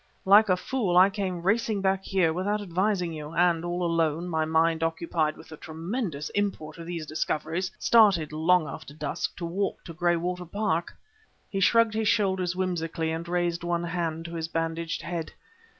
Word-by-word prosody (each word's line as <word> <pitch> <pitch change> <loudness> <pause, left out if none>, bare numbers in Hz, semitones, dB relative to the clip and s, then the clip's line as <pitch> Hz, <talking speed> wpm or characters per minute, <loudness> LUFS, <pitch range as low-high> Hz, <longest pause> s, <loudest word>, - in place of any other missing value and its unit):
Like 205 +2 +7
a 185 - +4
fool 195 -4 0
I 190 +2 +7
came 190 -4 -3
racing 215 +2 +1
back 190 0 +1
here 180 -5 +2
without 200 +5 -1
advising 185 -2 0
you; 155 +1 -7
and, 170 -1 +3
all 175 +1 -2
alone, 165 0 0
my 160 -2 0
mind 160 +1 +2
occupied 165 -1 -1
with - - -14
the 155 - -9
tremendous 160 - -4
import 200 -6 -3
of 165 - -8
these 170 -3 -4
discoveries, 160 +4 -2
started, 200 -10 +4
long 160 +2 +3
after 145 - -9
dusk, 155 +1 -3
to 170 - -4
walk 190 +4 -2
to 165 - -9
Graywater 175 +1 0
Park." 175 -2 -2 0.6
He 195 - -1
shrugged 230 +3 +4
his 220 0 0
shoulders 190 -4 +1
whimsically, 165 -3 -2
and 165 +1 -4
raised 175 -1 0
one 175 0 -1
hand 165 -1 -3
to 170 - -7
his 165 -1 -3
bandaged 165 0 -3
head. 170 -2 -4
175 Hz, 175 wpm, -27 LUFS, 165-190 Hz, 0.6 s, Like